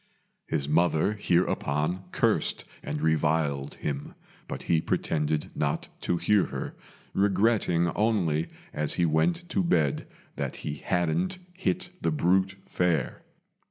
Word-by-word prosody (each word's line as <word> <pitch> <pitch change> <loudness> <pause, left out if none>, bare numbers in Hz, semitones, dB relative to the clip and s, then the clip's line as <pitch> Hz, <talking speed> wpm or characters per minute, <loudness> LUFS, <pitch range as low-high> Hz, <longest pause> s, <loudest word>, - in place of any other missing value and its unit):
His 70 - -1
mother 80 +4 +3
hereupon 90 -3 0
cursed - - +1 0.2
and 75 +1 -4
reviled 75 -3 +1
him, 70 -1 -4 0.3
but - - -5
he 80 -2 +2
pretended 75 -1 0
not - - -1
to 85 - 0
hear 105 +2 +3
her, - - -5 0.4
regretting 95 -3 +3
only 90 -7 +1 0.3
as 75 0 -1
he 85 - +3
went 165 - +1
to 190 - +1
bed 80 - +1 0.3
that - - -2
he 75 -1 -3
hadn't 90 - 0 0.2
hit 185 -1 -1
the - - +2
brute 95 - +2
fair. 85 -7 0
85 Hz, 125 wpm, -28 LUFS, 75-95 Hz, 0.4 s, mother